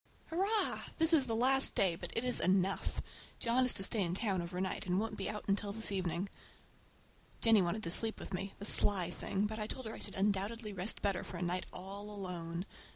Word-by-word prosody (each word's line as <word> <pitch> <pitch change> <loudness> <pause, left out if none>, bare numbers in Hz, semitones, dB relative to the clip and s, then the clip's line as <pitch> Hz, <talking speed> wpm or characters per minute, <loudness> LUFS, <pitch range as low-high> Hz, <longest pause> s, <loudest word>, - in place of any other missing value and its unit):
Hurrah! 400 +6 +1 0.2
This 325 0 +3
is 280 -5 +5
the 225 - 0
last 265 +3 +6
day, 185 -4 +3
but - - -6
it 230 - +1
is 250 -1 +1
enough. 190 +1 +1 0.3
John 245 +2 +2
is - - +5
to 195 - -2
stay 215 +2 0
in 175 -1 0
town 195 -4 0
over 175 +1 -5
night, 190 0 -2
and 180 +1 +2
won't 225 +1 -2
be 195 - -3
out 210 0 -5
until 200 0 +1
this 220 0 0
evening. 185 -1 -1 1.1
Jennie 225 -3 +5
wanted 185 +5 -1
to 165 - -1
sleep 225 +5 0
with - - -7
me—the 195 +2 -5
sly 185 -4 +2
thing! 195 +3 -1
but 215 +1 -3
I 210 - -2
told 260 +2 -6
her 220 - -5
I - - -8
should 205 - -7
undoubtedly 205 +3 0
rest 190 +3 0
better 195 -2 +1
for 180 - -7
a 175 - -3
night 180 +1 -1
all 195 +3 -7
alone. 180 -3 -5
200 Hz, 220 wpm, -34 LUFS, 185-225 Hz, 1.1 s, last